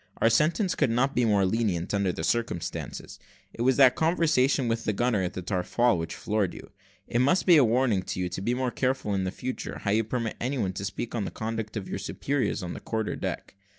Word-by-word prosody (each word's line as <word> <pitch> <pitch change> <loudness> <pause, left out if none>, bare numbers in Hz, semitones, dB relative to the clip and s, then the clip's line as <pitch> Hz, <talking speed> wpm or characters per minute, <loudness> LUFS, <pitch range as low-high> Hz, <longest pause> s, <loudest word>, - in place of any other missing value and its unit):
Our 115 - +3
sentence 170 - +2
could 145 - +1
not 130 +4 +1
be 125 - +2
more 100 -3 +3
lenient, 95 -4 0
under 100 -2 +1
the 80 - -5
circumstances: 100 -6 -3 0.3
it - - -7
was 130 +1 +3
that 130 -3 +7
conversation 155 -6 +2
with 115 0 -1
the 105 - 0
gunner 120 -1 +1
at 90 -1 -2
the 95 - -5
taffrail 105 +6 +1
which 80 -1 -4
floored 105 -3 -1
you. - - -11 0.3
It 120 - -1
must 160 +9 +3
be 175 - +7
a 145 - +7
warning 115 -3 +2
to 90 - -5
you 90 - 0
to 90 - -5
be 120 +5 0
more 130 -1 -1
careful 130 -5 -1
in 95 -1 0
future, 125 +6 -5
how 100 - 0
you 110 +2 +3
permit 115 0 -3
any 130 +3 -1
one 95 -6 -1
to 95 +1 -5
speak 100 +4 -4
of 115 - -1
the - - -3
conduct 110 -1 -4
of 95 - -5
your - - -4
superiors 135 -7 -2
on 85 - -4
the - - -7
quarter 110 -1 -3
deck. - - -5
115 Hz, 230 wpm, -27 LUFS, 100-130 Hz, 0.3 s, that